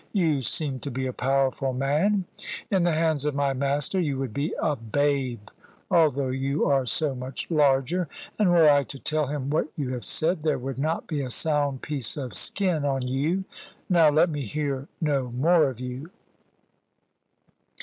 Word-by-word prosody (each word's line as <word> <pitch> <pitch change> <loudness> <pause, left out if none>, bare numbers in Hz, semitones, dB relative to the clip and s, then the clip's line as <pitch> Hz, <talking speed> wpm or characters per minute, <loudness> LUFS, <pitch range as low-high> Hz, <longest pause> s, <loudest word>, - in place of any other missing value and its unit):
You 160 -9 +2
seem 135 0 -2
to 140 - -5
be 130 +1 -3
a 130 - -3
powerful 135 +1 0
man: 155 +10 +1 0.5
in 190 -2 +3
the 175 0 +3
hands 160 -3 +1
of 150 -1 -1
my 140 -1 +1
master 140 +7 0
you 145 -6 0
would 130 -5 -3
be 145 +6 -1
a 150 -2 +1
babe, 125 -1 -1 0.4
although 145 -5 +3
you 135 +3 0
are 135 -2 +2
so 150 +2 +1
much 130 +5 -6
larger. 150 +3 +2 0.3
And 205 -4 +4
were 170 -3 +6
I 145 -1 +5
to 140 - -8
tell 150 +1 -1
him 140 -1 -3
what 155 - +1
you 140 -4 -3
have 125 -2 -4
said, 165 +1 0
there 155 -1 +1
would 130 +1 -5
not 155 +4 -1
be 150 -4 -2
a 130 - -4
sound 145 -1 0
piece 140 -5 -2
of 130 -4 -5
skin 180 -7 0
on 135 -3 -1
you. 150 +9 0 0.5
Now, 170 -4 +6
let 155 +3 +3
me 145 -1 -3
hear 140 +2 -3
no 140 -5 0
more 155 +2 +4
of 125 -3 -8
you." 125 +5 -6
145 Hz, 180 wpm, -26 LUFS, 135-155 Hz, 0.5 s, were